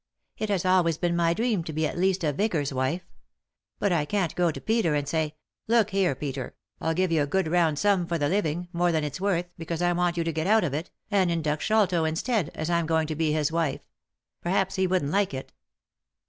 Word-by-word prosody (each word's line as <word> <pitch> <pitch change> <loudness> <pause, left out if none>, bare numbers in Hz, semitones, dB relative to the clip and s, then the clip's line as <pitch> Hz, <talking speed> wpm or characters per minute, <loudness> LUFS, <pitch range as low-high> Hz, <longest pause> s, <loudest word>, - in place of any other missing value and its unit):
It 215 - -3
has 190 -3 0
always 180 -4 +3
been 175 0 0
my 170 0 +2
dream 225 -5 0
to 160 - -6
be 155 +1 0
at - - -3
least 185 +1 +1
a 150 -2 +1
vicar's 155 -6 0
wife. 130 +8 -1 0.7
But 200 - 0
I 160 -4 +2
can't 190 -1 -1
go 175 -1 +2
to 160 - -4
Peter 220 -9 +1
and 145 -1 -1
say, 155 0 -1 0.3
'Look 225 -2 +3
here, 190 -7 +2
Peter, 135 -3 -5 0.2
I'll 160 0 -1
give 185 0 +1
you 160 -2 +3
a 145 - 0
good 190 +4 0
round 165 -2 +2
sum 195 -1 +2
for 170 - -1
the 145 -2 +1
living, 175 -1 -1
more 175 0 +2
than 160 -2 0
it's 150 +5 -4
worth, 185 -3 +1
because 165 +1 -3
I 175 0 +3
want 175 0 0
you 170 - +1
to 165 0 -2
get 160 +3 -1
out 220 0 +4
of 150 -6 -1
it, 155 +4 -3 0.2
and 190 -3 +3
induct 155 -3 -1
Sholto 195 -6 +2
instead, 165 - 0
as 155 - -3
I'm 170 -1 +1
going 160 -1 +2
to 155 - -2
be 155 0 +1
his 155 0 +1
wife.' 165 -4 -1 0.6
Perhaps 190 +2 0
he 190 0 +1
wouldn't 180 -6 0
like 195 -6 +1
it." 130 - -7
170 Hz, 230 wpm, -26 LUFS, 155-185 Hz, 0.7 s, out